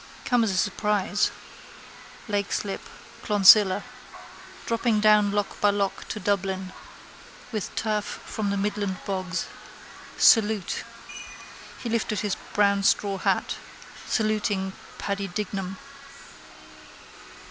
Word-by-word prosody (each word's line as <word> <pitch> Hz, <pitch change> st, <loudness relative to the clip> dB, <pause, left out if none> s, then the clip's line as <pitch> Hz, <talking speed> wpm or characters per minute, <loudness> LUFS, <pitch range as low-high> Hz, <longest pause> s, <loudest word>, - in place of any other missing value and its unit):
Come 245 Hz, -2 st, +3 dB
as 220 Hz, -, +1 dB
a 190 Hz, -, -1 dB
surprise, 205 Hz, 0 st, +1 dB, 1.0 s
Leixlip, 200 Hz, -1 st, -2 dB, 0.4 s
Clonsilla. 205 Hz, -1 st, +6 dB, 0.8 s
Dropping 230 Hz, -1 st, +1 dB
down 210 Hz, -1 st, +5 dB
lock 205 Hz, 0 st, -2 dB
by 205 Hz, -, +5 dB
lock 200 Hz, -1 st, -1 dB
to 215 Hz, -, -4 dB
Dublin. 190 Hz, -1 st, -1 dB, 0.8 s
With 215 Hz, -4 st, -4 dB
turf 215 Hz, -2 st, 0 dB
from 210 Hz, 0 st, -5 dB
the 200 Hz, -, -1 dB
midland 200 Hz, -1 st, -2 dB
bogs. 185 Hz, -2 st, -2 dB, 0.7 s
Salute. 215 Hz, -4 st, +4 dB, 1.0 s
He -, -, -3 dB
lifted 225 Hz, -3 st, -1 dB
his 210 Hz, -3 st, -1 dB, 0.2 s
brown 200 Hz, -1 st, +3 dB
straw 195 Hz, 0 st, +1 dB
hat, -, -, 0 dB, 0.5 s
saluting 210 Hz, -3 st, 0 dB, 0.2 s
Paddy 200 Hz, 0 st, -3 dB
Dignam. 195 Hz, -1 st, -4 dB
205 Hz, 100 wpm, -25 LUFS, 195-210 Hz, 1.0 s, Clonsilla